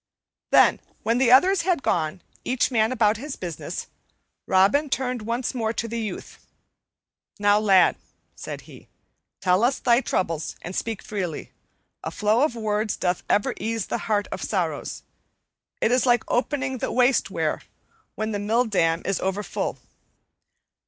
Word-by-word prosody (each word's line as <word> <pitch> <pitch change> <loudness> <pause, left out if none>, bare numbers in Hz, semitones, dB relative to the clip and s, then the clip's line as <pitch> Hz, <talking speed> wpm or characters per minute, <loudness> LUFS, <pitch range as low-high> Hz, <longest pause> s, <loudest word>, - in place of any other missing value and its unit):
Then, - - +5 0.2
when 230 +3 +1
the 250 -2 +4
others 365 +8 +6
had 340 -4 0
gone, 165 +2 -1 0.2
each 255 +1 0
man 220 -1 +2
about 220 -3 +2
his 280 +4 -6
business, 170 -4 -5 0.6
Robin 200 +11 +3
turned 250 -2 -1
once 235 +4 -2
more 225 -3 -1
to 230 - -3
the 230 +1 -3
youth. 215 -5 -6 0.9
"Now, 205 0 +4
lad," 195 -4 +4 0.4
said - - -7
he, - - -15 0.5
"tell 185 +2 +3
us 255 +3 +3
thy 240 0 +3
troubles, 165 - -2
and 180 +2 -6
speak 225 -3 -3
freely. 185 -7 -4 0.5
A - - -3
flow 215 +3 +1
of 290 -4 +1
words 215 -1 -1
doth 180 -1 0
ever 205 - +2
ease 225 0 -2
the - - -3
heart 205 -1 +2
of - - -5
sorrows; - - -2 0.8
it 225 - +2
is 255 +1 +2
like 240 -1 +4
opening 260 0 -1
the - - -2
waste 250 +1 +3
weir - - -1 0.5
when 220 +1 -2
the 205 - -2
mill 225 +5 +1
dam 165 -6 +1
is 195 -2 0
overfull. 195 +2 -2
220 Hz, 150 wpm, -24 LUFS, 200-250 Hz, 0.9 s, others